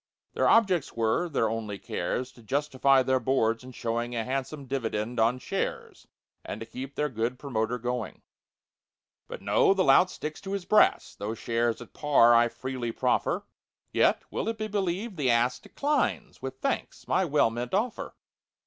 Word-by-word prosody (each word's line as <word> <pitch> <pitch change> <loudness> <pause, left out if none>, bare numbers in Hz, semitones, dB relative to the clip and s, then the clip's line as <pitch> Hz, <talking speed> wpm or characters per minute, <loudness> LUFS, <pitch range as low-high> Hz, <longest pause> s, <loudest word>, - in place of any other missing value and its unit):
Their - - +2
objects 190 -9 +3
were—their 115 +3 +1
only 110 -2 -3
cares— 125 +8 -3
To 120 - -17
justify 135 +2 +2
their 130 0 +2
Boards 115 -2 +1
in 130 - -10
showing 120 0 -3
A 115 - -1
handsome 135 +3 -4
dividend 120 -3 -2
on 115 +3 +3
shares 125 - -4 0.4
And - - -6
keep 135 +2 -7
their 150 - 0
good 120 -1 -2
promoter 125 -3 -2
going. 125 -1 -4 1.0
But - - -8
no—the 195 -1 +3
lout 180 +6 +6
sticks 155 -3 -6
to 195 0 -5
his 195 -3 -3
brass, 215 - +3
Though 105 +3 -4
shares 115 +1 -1
at - - -20
par 140 -6 +5
I 120 0 +5
freely 125 -1 -4
proffer: - - 0 0.5
Yet—will - - +1
it 225 - -3
be 215 0 -3
believed?—the 190 - -1
ass 120 +1 +2
Declines, 295 +1 -1
with - - -6
thanks, - - -3
my - - +2
well 150 -8 +2
meant 120 +6 -3
offer! 225 +4 -2
130 Hz, 155 wpm, -28 LUFS, 115-150 Hz, 1.0 s, lout